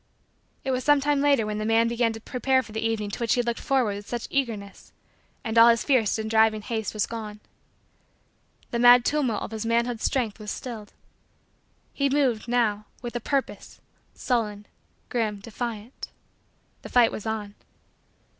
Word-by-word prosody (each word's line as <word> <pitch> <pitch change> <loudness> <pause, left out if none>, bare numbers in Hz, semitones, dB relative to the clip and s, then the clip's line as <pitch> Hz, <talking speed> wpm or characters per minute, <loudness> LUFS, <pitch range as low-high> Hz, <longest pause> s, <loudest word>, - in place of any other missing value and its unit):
It 270 - -1
was 255 0 -1
sometime 290 -1 +3
later 280 -6 +3
when 210 0 -3
the - - -2
man 225 +1 +3
began 235 0 +1
to 225 - -8
prepare 260 +3 0
for 225 - -13
the 220 +1 -3
evening 220 -2 -1
to - - -6
which 235 -2 +1
he - - 0
had 245 - +1
looked 235 -1 -2
forward 250 -7 0
with 205 - -10
such 240 -1 -3
eagerness 220 -8 -3 0.5
and 230 -2 +2
all 230 +1 +9
his 230 -1 +3
fierce 250 -8 +2
and 220 0 -3
driving 220 -1 +3
haste 220 -2 -3
was 210 - +1
gone. 215 -2 -7 1.3
The 235 - -1
mad 245 0 +7
tumult 275 -7 0
of - - -6
his 220 -1 -4
manhood 235 0 0
strength 235 -6 -1
was 210 -1 -7
stilled. 220 -2 -7 1.0
He 280 -1 +1
moved, 265 -6 +1
now, 220 -4 0 0.2
with 240 0 -6
a - - 0
purpose, 275 +3 -3 0.4
sullen, 210 -5 -1 0.4
grim, 225 -4 -1
defiant. 230 +2 -6 0.7
The - - -9
fight 245 -2 +4
was 215 - -6
on. 215 -2 -3
230 Hz, 175 wpm, -25 LUFS, 215-245 Hz, 1.3 s, all